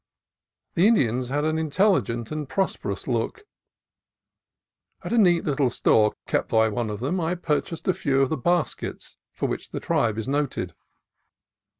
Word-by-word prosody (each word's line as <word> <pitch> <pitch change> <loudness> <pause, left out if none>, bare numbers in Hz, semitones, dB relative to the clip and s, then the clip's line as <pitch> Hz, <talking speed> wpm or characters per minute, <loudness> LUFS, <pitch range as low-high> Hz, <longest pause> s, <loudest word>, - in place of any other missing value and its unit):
The 180 +5 +4
Indians 125 - +2
had 145 +2 0
an 155 0 0
intelligent 145 - +1
and 150 -3 -4
prosperous 105 - -2
look. 120 - -2 1.6
At - - -3
a - - +2
neat 175 -5 +4
little 140 -3 +1
store 105 -2 +3
kept - - -1
by 110 0 +3
one 115 0 -2
of 105 +1 -5
them, 165 +9 -1
I 170 +1 0
purchased 165 -1 -2
a 185 - +4
few 135 -4 0
of 135 - 0
the - - 0
baskets 175 +5 -2
for - - -2
which - - -4
the - - -4
tribe 110 -2 0
is 115 - -3
noted. 145 0 -1
140 Hz, 160 wpm, -25 LUFS, 120-170 Hz, 1.6 s, The